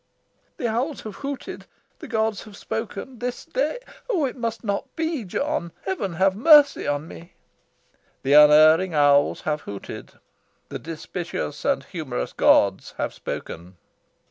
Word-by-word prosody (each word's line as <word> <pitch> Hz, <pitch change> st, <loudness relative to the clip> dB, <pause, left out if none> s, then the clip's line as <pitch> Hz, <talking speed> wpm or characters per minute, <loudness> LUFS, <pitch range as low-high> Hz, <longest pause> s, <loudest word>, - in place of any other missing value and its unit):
"The 240 Hz, -, -1 dB
owls 250 Hz, +6 st, -2 dB
have 215 Hz, -2 st, -8 dB
hooted. 280 Hz, -1 st, -6 dB, 0.3 s
The -, -, -9 dB
gods 220 Hz, -3 st, -1 dB
have 205 Hz, -2 st, -13 dB
spoken. 225 Hz, +2 st, -6 dB
This 245 Hz, 0 st, -4 dB
day 290 Hz, -, -1 dB, 0.3 s
oh, 355 Hz, -, +1 dB
it 255 Hz, -, -4 dB
must 230 Hz, -2 st, -4 dB
not 200 Hz, -2 st, -2 dB
be, 320 Hz, -5 st, -2 dB
John! 235 Hz, -, -2 dB
Heaven 190 Hz, -1 st, -2 dB
have 190 Hz, +2 st, +2 dB
mercy 290 Hz, +5 st, +6 dB
on 145 Hz, +2 st, -2 dB
me!" 170 Hz, +2 st, -13 dB, 0.9 s
"The 135 Hz, -, +2 dB
unerring 155 Hz, +4 st, +7 dB
owls 145 Hz, -1 st, +4 dB
have 150 Hz, -1 st, -2 dB
hooted. 100 Hz, -1 st, -9 dB, 0.6 s
The -, -, -6 dB
dispiteous 165 Hz, -1 st, -5 dB
and 280 Hz, -1 st, +1 dB
humorous 150 Hz, -, -5 dB
gods 100 Hz, -1 st, +3 dB
have -, -, -2 dB
spoken. 90 Hz, +2 st, -7 dB
200 Hz, 140 wpm, -23 LUFS, 155-250 Hz, 0.9 s, unerring